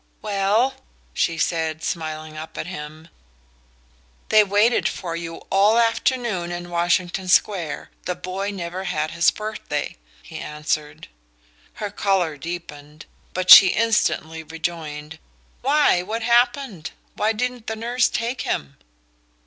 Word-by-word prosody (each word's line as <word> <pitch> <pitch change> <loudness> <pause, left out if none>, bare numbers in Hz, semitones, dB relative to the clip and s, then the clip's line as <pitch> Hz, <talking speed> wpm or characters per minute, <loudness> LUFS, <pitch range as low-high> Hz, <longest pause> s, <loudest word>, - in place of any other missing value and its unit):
"Well?" 210 +5 +1 0.4
she 165 - 0
said, 160 -2 -1
smiling 155 -1 -4
up 155 +1 -8
at - - -3
him. 155 -1 -8 1.2
"They 215 -1 +7
waited 205 +4 +2
for 170 -2 -5
you 165 -1 -5 0.2
all 200 +3 +4
the 235 - +5
afternoon 230 -6 0
in 175 0 -6
Washington 175 +2 0
Square 180 -3 +1
the 180 - -2
boy 185 +3 -4
never 185 -1 -5
had 155 -4 -2
his 170 +1 +4
birthday," 215 - -4 0.3
he - - -9
answered. 150 0 -4 0.7
Her 210 -2 -5
colour 190 -6 0
deepened, 150 -1 -8 0.3
but 185 0 +2
she 190 - +12
instantly 185 -6 +1
rejoined: 160 -1 -6 0.4
"Why, 280 -8 +3
what 220 +5 -4
happened? 240 - +1 0.2
Why 215 +1 +1
didn't 245 +1 -3
the 220 - -2
nurse 240 +3 +1
take 235 +3 -2
him?" 70 -1 -3
180 Hz, 125 wpm, -22 LUFS, 160-215 Hz, 1.2 s, she